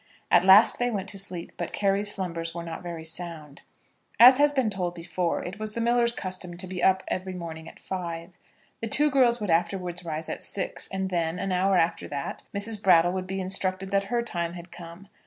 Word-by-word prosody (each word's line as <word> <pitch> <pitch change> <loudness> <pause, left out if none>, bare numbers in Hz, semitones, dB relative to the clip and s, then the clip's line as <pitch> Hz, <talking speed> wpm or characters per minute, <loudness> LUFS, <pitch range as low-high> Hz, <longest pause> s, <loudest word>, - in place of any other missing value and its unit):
At - - +6
last 200 +4 +7
they 245 0 +1
went 200 -4 -3
to 195 - -5
sleep, 185 -3 -5
but - - -4
Carry's 200 +1 +1
slumbers 170 -4 -3
were 170 - -4
not 165 -1 -7
very 170 -2 -7
sound. 160 -3 -5 0.6
As 255 +3 +9
has 290 0 +5
been 260 -6 0
told 180 -3 -3
before, 170 0 -2
it 190 +4 -7
was 215 0 -2
the - - -2
miller's 235 0 +3
custom 185 -5 -5
to 185 - -4
be 185 -1 -5
up 190 +1 +3
every 185 0 -3
morning 165 -2 -7
at - - -17
five. 170 -2 -6 0.5
The 225 - -2
two 295 +6 +4
girls 245 -3 +3
would 205 -5 -2
afterwards 175 +1 -1
rise 160 -1 -4
at - - -5
six, 195 - -2
and 190 0 -3
then, 165 -1 -1
an 190 +1 -3
hour 185 +1 +2
after 165 0 0
that, 140 -1 -5
Mrs. 205 +1 0
Brattle 175 -3 +5
would 185 -1 -4
be 190 +1 -3
instructed 190 0 -2
that 195 0 +1
her 235 +3 -1
time 170 -6 -3
had 175 0 -10
come. 175 +3 -11
185 Hz, 210 wpm, -26 LUFS, 170-200 Hz, 0.6 s, As